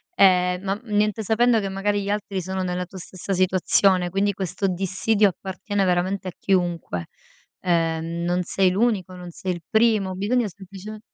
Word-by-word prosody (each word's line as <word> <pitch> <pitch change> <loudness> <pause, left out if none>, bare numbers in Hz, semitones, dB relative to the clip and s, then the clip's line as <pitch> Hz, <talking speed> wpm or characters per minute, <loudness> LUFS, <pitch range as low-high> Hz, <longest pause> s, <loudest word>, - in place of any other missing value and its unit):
Ehm, 180 -2 +4
ma 195 +1 -2
niente, 210 -1 0
sapendo 225 +2 +3
che 195 - -3
magari 200 +1 -1
gli 200 - -4
altri 205 -2 -2
sono 190 +1 -3
nella 180 0 -2
tua 190 - -12
stessa 185 +1 -8
situazione, 185 0 +3
quindi 200 +3 +1
questo 195 +1 -2
dissidio 195 +3 +2
appartiene 195 +2 -3
veramente 185 +2 0
a 185 - -3
chiunque. 175 - -1 0.6
Ehm, 165 -1 0
non 175 +1 +1
sei 185 +1 +2
l'unico, 195 -3 0
non 180 -1 -9
sei 185 +2 -3
il 175 - -8
primo, 220 -4 +2
bisogna 215 +3 0
sempliceme 200 +3 -10
190 Hz, 160 wpm, -23 LUFS, 180-205 Hz, 0.6 s, Ehm